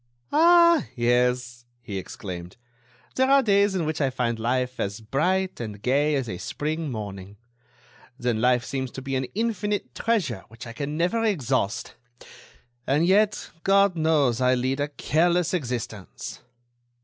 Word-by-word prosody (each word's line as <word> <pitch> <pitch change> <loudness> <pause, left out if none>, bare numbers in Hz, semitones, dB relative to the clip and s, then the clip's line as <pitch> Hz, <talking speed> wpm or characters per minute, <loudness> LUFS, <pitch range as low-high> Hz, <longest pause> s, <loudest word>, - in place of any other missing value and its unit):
"Ah! 340 0 +5
yes," 120 0 +1
he 105 -5 -5
exclaimed, 90 -1 -8 0.6
"there 260 +1 +2
are 275 0 +5
days 200 -2 +3
in 175 -4 0
which 155 0 -2
I 135 - +2
find 120 -3 -2
life 125 +2 -1
as 100 +2 -2
bright 180 - 0
and 105 -3 -6
gay 140 +6 +2
as 135 -3 -1
a 90 -5 -5
spring 155 - -3
morning; 100 -4 -7 0.8
then 120 -3 -1
life 125 0 +3
seems 130 0 -3
to 135 - -6
be 135 0 -3
an 130 -1 -1
infinite 210 -2 -1
treasure 185 - -1
which 115 +2 -11
I 115 - -8
can 145 +4 -4
never 180 +7 +1
exhaust. 125 - -1 0.9
And 150 +5 +3
yet 205 +3 +2
God 195 -1 +4
knows 150 -7 +2
I 125 0 +4
lead 130 +2 -1
a 145 - 0
careless 170 +4 +1
existence!" 120 - -5
135 Hz, 150 wpm, -25 LUFS, 120-180 Hz, 0.9 s, Ah